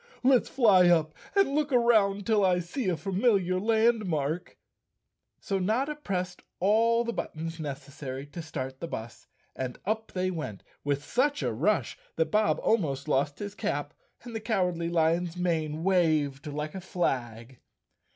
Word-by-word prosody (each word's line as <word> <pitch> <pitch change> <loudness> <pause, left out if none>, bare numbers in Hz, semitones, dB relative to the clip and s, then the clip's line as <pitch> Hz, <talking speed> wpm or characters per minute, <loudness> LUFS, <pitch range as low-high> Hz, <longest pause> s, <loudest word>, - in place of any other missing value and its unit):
"Let's 255 -1 +4
fly 200 -9 +5
up 160 -3 +3 0.2
and 390 -8 +3
look 300 0 0
around 215 -5 +3
till 215 -3 +3
I 185 -2 +4
see 185 +6 -2
a 175 - 0
familiar 190 - +1
landmark. 205 -8 +1 0.8
So 195 -1 -2
Notta 245 +10 0
pressed 185 -10 -4 0.2
all 230 +5 +3
the 235 0 -3
buttons 165 -3 -5
necessary 140 -2 -6
to 170 +4 -8
start 130 -4 -6
the 170 - -4
bus, 115 -7 -7 0.3
and 130 -2 -4
up 220 +2 -2
they 185 0 0
went 150 - -5 0.2
with 145 0 -1
such 285 - +1
a - - 0
rush 180 - 0 0.2
that 160 - 0
Bob 215 0 +2
al¬ 225 - +4
most 140 -5 -3
lost 145 0 +1
his 205 -1 -5
cap 145 -6 -3 0.3
and 240 -2 -8
the - - -1
Cowardly 180 -6 0
Lion's 170 +1 +1
mane 160 -3 -1
waved 155 -7 +2
like 150 +1 -4
a 190 - -6
flag. 125 - -3
180 Hz, 155 wpm, -28 LUFS, 150-215 Hz, 0.8 s, fly